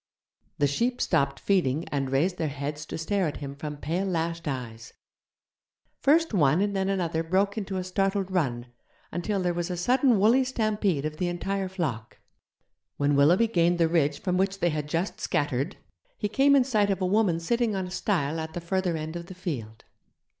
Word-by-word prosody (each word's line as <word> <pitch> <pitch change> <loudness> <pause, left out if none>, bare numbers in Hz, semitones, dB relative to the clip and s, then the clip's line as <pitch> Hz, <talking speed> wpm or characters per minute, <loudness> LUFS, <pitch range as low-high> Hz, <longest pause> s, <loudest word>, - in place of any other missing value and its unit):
The 145 - +3
sheep 235 - 0
stopped 140 -5 +1
feeding 170 -6 +1
and 135 -2 -1
raised 170 +7 +1
their 160 - 0
heads 145 +2 -5
to - - -5
stare 185 +3 0
at 150 - -4
him 140 -1 -7
from 150 +1 -6
pale 170 +7 -2
lashed 165 -2 -2
eyes; 120 -5 -5 1.1
first 320 0 +3
one 155 -3 +4
and 200 0 0
then 190 0 0
another 170 -4 0
broke 190 +5 +1
into 195 -3 -3
a 185 - -2
startled 195 +1 -1
run, 130 -10 0 0.5
until 195 +4 -2
there 175 -1 +1
was 175 +1 -3
a 180 - -3
sudden 250 +5 +3
woolly 230 +6 +5
stampede 215 - 0
of 155 0 -4
the 180 - -1
entire 190 +2 -2
flock. 145 - -4 0.8
When 145 0 +2
Willoughby 165 +10 +5
gained 175 -3 +2
the 165 -1 +3
ridge 150 -3 +1
from 180 -2 -1
which 195 +1 0
they 175 - +2
had 150 -2 -3
just 170 +5 -2
scattered, 145 +4 -1 0.4
he 210 - -1
came 275 +6 +4
in 270 - +5
sight 215 -6 +1
of 195 - 0
a 185 - 0
woman 185 -3 +2
sitting 230 +5 0
on 190 -1 -2
a 180 - -8
stile 165 -6 -1
at 160 0 -5
the - - -2
further 175 0 -1
end 155 +1 -5
of 170 0 -6
the 185 - -9
field. 120 - -6
175 Hz, 195 wpm, -27 LUFS, 150-195 Hz, 1.1 s, woolly